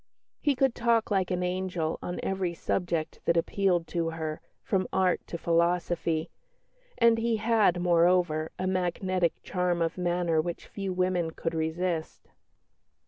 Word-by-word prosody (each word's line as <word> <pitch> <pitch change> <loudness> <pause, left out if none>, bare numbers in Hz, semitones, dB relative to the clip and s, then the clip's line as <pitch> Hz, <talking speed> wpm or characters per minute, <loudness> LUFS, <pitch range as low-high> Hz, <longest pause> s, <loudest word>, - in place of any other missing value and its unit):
He 290 -2 +1
could 265 -1 +2
talk 235 -2 +1
"like 190 -2 +1
an 180 0 -1
angel" 180 -3 -2
on 175 - -4
every 190 -3 -1
subject 170 -2 -2
that 170 - +3
appealed 180 0 +1
to 165 -2 -1
her, 160 -1 -4 0.2
from 185 -2 0
art 185 -2 +2
to 170 - -4
philosophy; 170 -1 0 0.7
and 230 -1 +5
he 230 0 +1
had, 215 -5 +3
moreover, 175 -2 +3
a 185 - -2
magnetic 185 -1 0
charm 180 -2 0
of 165 +2 -1
manner 175 -2 +1
which 170 +1 -5
few 195 -2 -5
women 180 -2 0
could 165 +1 -4
resist. 160 +1 -2
180 Hz, 140 wpm, -28 LUFS, 170-185 Hz, 0.7 s, and